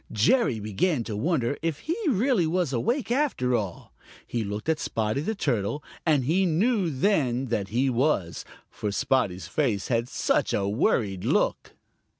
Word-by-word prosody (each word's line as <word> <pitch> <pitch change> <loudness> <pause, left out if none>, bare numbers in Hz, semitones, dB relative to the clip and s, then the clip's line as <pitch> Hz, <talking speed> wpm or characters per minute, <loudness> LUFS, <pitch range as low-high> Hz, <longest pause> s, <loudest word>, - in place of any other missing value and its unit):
Jerry 120 - +2
began 115 - 0
to 110 -2 -5
wonder 140 +1 0
if 160 -3 -2
he 330 - -2
really 235 - +2
was 170 -4 0
awake 235 - -1
after 240 - +1
all. 100 -6 -4 0.3
He 120 -2 -2
looked 105 +4 -5
at 160 -1 +1
Spotty 110 +4 -1
the 220 +8 -2
Turtle, 135 - -1 0.2
and 150 -4 +3
he 175 +7 +2
knew 195 +3 +2
then 135 - +1
that 105 -4 -1
he 125 +6 +1
was, 125 - 0 0.3
for 105 - -3
Spotty's 100 -5 0
face 115 -10 -1
had 120 0 0
such - - +1
a 100 -1 0
worried 100 -2 0
look. - - 0
130 Hz, 155 wpm, -26 LUFS, 110-170 Hz, 0.3 s, and